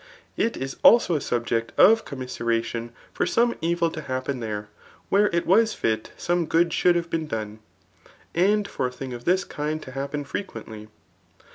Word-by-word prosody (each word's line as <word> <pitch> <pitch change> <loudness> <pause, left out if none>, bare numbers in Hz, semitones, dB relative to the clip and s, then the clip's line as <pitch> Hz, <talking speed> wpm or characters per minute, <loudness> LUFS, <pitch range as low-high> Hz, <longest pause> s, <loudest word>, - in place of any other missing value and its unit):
It 230 - 0
is 135 0 -5
also 230 -6 +6
a 150 - 0
subject 115 -2 -1
of 225 +1 +6
commiseradon 120 -3 -3 0.2
for - - 0
some 235 0 +2
evil 170 0 +1
to 155 - -6
happen 130 -1 -3
there, 105 -2 -4 0.4
where 205 +2 +4
it 170 0 0
was 220 +4 +4
fit 110 -1 -1
some 175 -2 0
good 170 0 +2
should 175 -1 +3
have 170 -1 -2
been 160 -1 -1
done. 110 -4 -5 0.7
And 200 +4 +2
for 130 - -2
a - - -6
thing 130 0 -7
of 120 0 -8
this 185 +2 +3
kind 150 +1 -3
to 130 - -10
happen 140 +2 -4
frequently. 110 - -7
145 Hz, 170 wpm, -25 LUFS, 120-175 Hz, 0.7 s, also